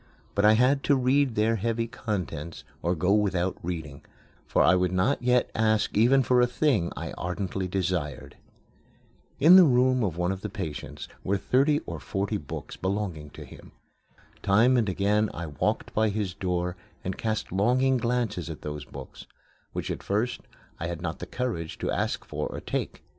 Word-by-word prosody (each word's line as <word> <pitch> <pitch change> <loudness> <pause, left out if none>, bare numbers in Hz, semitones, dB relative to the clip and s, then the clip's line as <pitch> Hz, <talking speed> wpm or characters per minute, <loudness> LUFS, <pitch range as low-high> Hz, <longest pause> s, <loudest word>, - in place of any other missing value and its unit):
But 100 +1 +2
I 105 - +7
had 130 +5 +3
to 145 - +4
read 130 -1 +2
their 110 +2 +2
heavy 115 +2 -1
contents 90 - -5 0.2
or 85 +2 0
go 90 +4 +2
without 95 -3 +1
reading, 80 -5 -5 0.5
for - - +3
I - - +6
would 90 -1 +2
not 100 +11 +1
yet 125 0 +2
ask 110 -1 +1
even 125 +6 +5
for 125 0 +3
a 125 - +4
thing 120 - +1
I - - -4
ardently 95 +1 -3
desired. 90 -6 -2 1.0
In 170 +6 +9
the 185 - +10
room 130 -3 +3
of 90 -6 -1
one 90 +1 0
of 95 0 -5
the 105 - -4
patients 75 - -6 0.2
were 100 +1 +1
thirty 140 +8 +2
or - - -5
forty 100 +2 -2
books 75 -8 -7
belonging 95 -6 -3
to - - -10
him. - - -14 0.7
Time 115 +6 +4
and 115 -5 +2
again 105 +3 +1
I 85 - -4
walked 75 -3 -2
by 110 0 +2
his 100 -3 -2
door 90 -1 -2 0.3
and 95 - -3
cast 110 -1 -2
longing 125 +7 +3
glances 120 -7 -1
at 80 - -8
those 75 -1 -5
books, - - -10 0.4
which - - -4
at - - -4
first 110 +5 -1 0.4
I 85 - -2
had 85 -1 -5
not 80 -1 -3
the - - -6
courage 110 -11 -3
to - - -2
ask - - -1
for - - -3
or - - -6
to - - -18
take. - - -3
100 Hz, 180 wpm, -27 LUFS, 90-120 Hz, 1.0 s, the